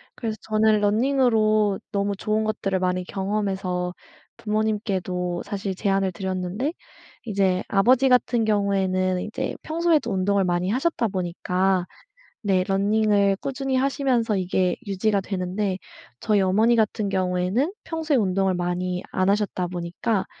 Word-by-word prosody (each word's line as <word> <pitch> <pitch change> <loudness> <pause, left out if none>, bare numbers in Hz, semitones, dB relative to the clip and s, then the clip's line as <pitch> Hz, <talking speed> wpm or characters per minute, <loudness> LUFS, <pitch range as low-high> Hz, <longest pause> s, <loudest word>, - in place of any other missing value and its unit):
그래서 225 -3 -3
저는 215 0 +2
running으로 215 -2 +2
너무 200 -1 0
좋은 215 +2 -1
것들을 195 -3 -1
많이 185 0 0
경험해서 190 -2 -2 0.4
부모님께도 200 -5 -1
사실 195 -2 -4
제안을 195 -1 +1
드렸는데 190 - -3 0.5
이제 195 -4 +1
아버지 250 +7 +4
같은 245 -2 +3
경우에는 190 -3 +1
이제 215 - -4
평소에도 320 -6 +1
운동을 195 +1 +1
많이 175 +1 0
하셨다 255 +1 0
보니까 185 0 0 0.6
네 190 -3 +2
러닝을 200 +1 +2
꾸준히 270 -1 -2
하시면서 255 -5 +1
이게 185 0 0
유지가 200 +1 +1
되는데 190 +1 -2 0.4
저희 210 -2 +2
어머니 215 +5 +3
같은 215 -2 +1
경우에는 190 - 0
평소에 320 -3 -1
운동을 195 -3 +1
많이 180 0 -2
안 185 +1 +1
하셨다 200 -3 0
보니까 180 +4 -2
200 Hz, 335 characters per minute, -24 LUFS, 185-220 Hz, 0.6 s, 아버지